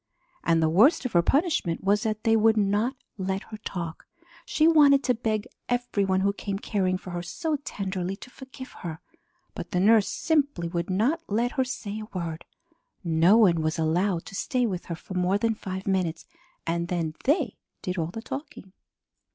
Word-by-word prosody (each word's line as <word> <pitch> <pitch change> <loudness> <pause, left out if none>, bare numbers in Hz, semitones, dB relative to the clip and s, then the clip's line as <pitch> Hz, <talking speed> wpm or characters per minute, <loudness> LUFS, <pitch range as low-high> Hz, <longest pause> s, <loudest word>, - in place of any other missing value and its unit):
And 165 -1 +3
the - - +4
worst 220 - +4
of 250 - -1
her 175 - +6
punishment 275 - +1
was 205 +2 +3
that 215 -1 -2
they 225 0 +4
would 220 0 +4
not 210 +5 +1 0.2
let 190 +1 -2
her 215 - -6
talk. 175 -6 -6 0.4
She 310 - +3
wanted 290 -4 +6
to 250 - +3
beg 220 -2 -1 0.2
every 245 -5 0
one 190 0 +1
who 200 +1 +2
came 200 -1 -4
caring 190 -3 0
for 185 - -9
her 175 0 -3
so 300 - -2
tenderly 190 -8 -4
to 250 +5 -13
forgive 260 -1 -10
her, 160 -3 -5 0.6
but - - -7
the 180 - 0
nurse 210 +1 +5
simply 285 - 0
would 170 +1 -3
not 235 - +1
let 235 +4 0
her 265 -3 +1
say 215 -5 -5
a 215 -2 -7
word. 165 -2 -4 0.6
No 170 +4 +5
one 180 -8 +5
was 155 +1 -1
allowed 170 +3 +1
to - - -10
stay 250 +5 0
with 185 -6 -3
her 170 - -4
for 175 - -10
more 180 +2 +2
than 225 +2 +1
five 190 -2 -6
minutes 180 -4 -1 0.4
and 170 +1 -1
then 170 -3 -2
they 285 - +1 0.3
did 185 -1 -2
all 160 - 0
the 225 +6 -7
talking. 275 -9 -7
200 Hz, 190 wpm, -26 LUFS, 175-240 Hz, 0.6 s, her